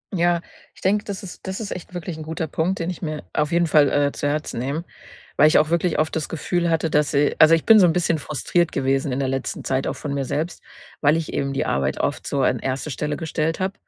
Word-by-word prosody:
Ja, 175 -1 +2 0.3
ich - - -18
denke, 205 +2 +2
das 200 -1 -5
ist 185 -1 -10
das 190 0 -4
ist 215 -3 -5
echt 180 0 -7
wirklich 175 -2 -5
'n 160 - -6
guter 160 +1 -4
Punkt, 170 +5 -1
den 165 +1 -2
ich 180 - -6
mir 155 -3 -4
auf 150 0 0
jeden 170 0 +2
Fall, 150 -2 +5
äh, 145 0 +2
zu 145 - -3
Herzen 150 -4 -2
nehme, 140 +6 -2 0.5
weil 150 - +7
ich 155 - +5
auch 155 0 +3
wirklich 170 0 +1
oft 155 +1 0
das 160 -2 -2
Gefühl 170 +2 -1
hatte, 165 0 +1
dass 150 0 +2
i 145 +1 +3
also, 155 +1 +8
ich 165 - -3
bin 225 -1 +8
so 180 - +7
'n 165 - +2
bisschen 170 -2 +1
frustriert 165 +4 0
gewesen 135 0 0
in 125 - -1
der 135 - 0
letzten 135 0 -3
Zeit 130 0 -1
auch - - -2
von 145 - -5
mir 140 -1 -1
selbst, 160 +6 -3 0.4
weil 145 +1 +4
ich 165 -2 -4
eben 140 0 -1
die 135 - -1
Arbeit 70 0 -1
oft - - -2
so - - 0
an - - +2
1. 135 +3 -3
Stelle 150 +2 -3
gestellt 160 0 -2
habe, 190 +1 -1
155 Hz, 260 wpm, -22 LUFS, 145-170 Hz, 0.5 s, also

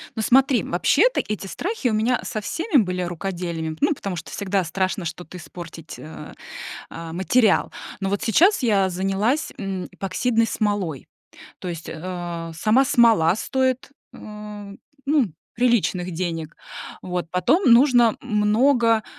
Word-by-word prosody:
Но 220 - -2
смотри, 260 -1 +4
вообще-то 320 - +2
эти 205 -2 -4
страхи 345 - -3
у - - -1
меня 230 +4 +1
со 215 -2 -4
всеми 335 - 0
были 180 -2 -2
рукоделиями, 170 -3 -4
ну, 300 +1 +3
потому 195 -6 -5
что 170 - -7
всегда 200 -1 -1
страшно 185 +2 -2
что-то 180 +3 -7
испортить, 170 -2 -10
э, 155 -1 -10 0.6
а, 165 0 -7
материал. 200 +5 +2 0.3
Но 195 - -1
вот 200 0 -1
сейчас 340 - +4
я 200 -5 +3
занялась, 195 - 0
м, 195 -2 -4
эпоксидной 225 +4 0
смолой, 205 - -2 0.5
то 185 - -7
есть, 165 -2 -6
э, 170 0 -5
сама 220 +11 +3
смола 220 -9 +4
стоит, 260 +2 -1 0.2
э, - - -12 0.9
ну, 285 -3 +3 0.3
приличных 220 -7 +1
денег. 165 -2 -4 0.4
Вот. 180 -2 -4
Потом 250 - +3
нужно 240 -2 +5
много 230 +1 +3
200 Hz, 135 wpm, -23 LUFS, 175-240 Hz, 0.9 s, нужно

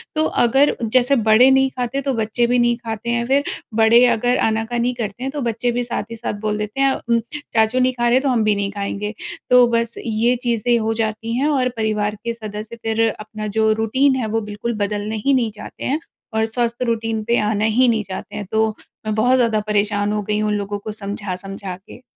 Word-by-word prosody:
तो 310 - +2 0.2
अगर 270 +5 +4
जैसे 250 +4 +3
बड़े 220 +4 +6
नहीं 265 0 +4
खाते 250 +2 -2
तो 275 0 -1
बच्चे 225 +1 0
भी 245 +1 +2
नहीं 240 0 +2
खाते 225 +1 -4
हैं 235 0 0
फिर 275 +3 +2 0.4
बड़े 230 +2 +6
अगर 245 +1 +2
आना-कानी 235 +3 0
करते 230 0 -5
हैं, 270 - -2
तो 290 -1 -4
बच्चे 235 +1 -1
भी 245 +1 -1
साथ 235 -3 -3
ही - - -4
साथ 230 -1 -4
बोल 210 0 0
देते 210 +5 -3
हैं 270 -1 +4
उम, 235 -1 0 0.3
चाचू 220 +3 +3
नहीं 255 0 +2
खा 240 -1 -1
रहे 235 - +3
हैं 260 - +4
तो 275 - +1
हम 235 -3 +2
भी 210 -1 +2
नहीं 200 0 -2
खाएँगे 205 +1 -4 0.4
तो 250 -1 +7
बस 230 0 -2
ये 230 +2 +2
चीज़ें 235 +1 +2
हो 225 0 0
जाती 220 +1 -3
हैं 280 +3 +1
और 265 -4 +2
परिवार 210 -1 0
के 235 0 -2
सदस्य 215 0 -7
फिर 225 0 +2
अपना 215 0 -6
जो 220 0 +4
रूटीन 260 +5 +2
है 255 -3 -1
वो 225 - 0
बिल्कुल 210 +3 -4
बदलना 210 +1 -3
ही 275 - +4
नहीं 240 -4 +1
चाहते 210 - -10
हैं 285 +4 0 0.4
और 220 0 +2
स्वस्थ 235 +1 -1
रूटीन 225 -2 -1
पे 235 +2 +1
आना 210 0 0
ही 235 +4 +3
नहीं 225 -3 +2
चाहते 195 +2 -7
हैं। 210 -1 -4
तो 220 0 +3 0.4
मैं 215 - -1
बहुत 245 +4 +3
ज़्यादा 230 -3 +2
परेशान 205 0 +1
हो 210 - -1
गई 210 +1 -1
हूँ 215 0 0
उन 210 - +1
लोगों 205 0 -3
को 215 +1 -6
समझा-समझा 195 -2 -5
के। - - -12
225 Hz, 225 wpm, -20 LUFS, 215-245 Hz, 0.4 s, तो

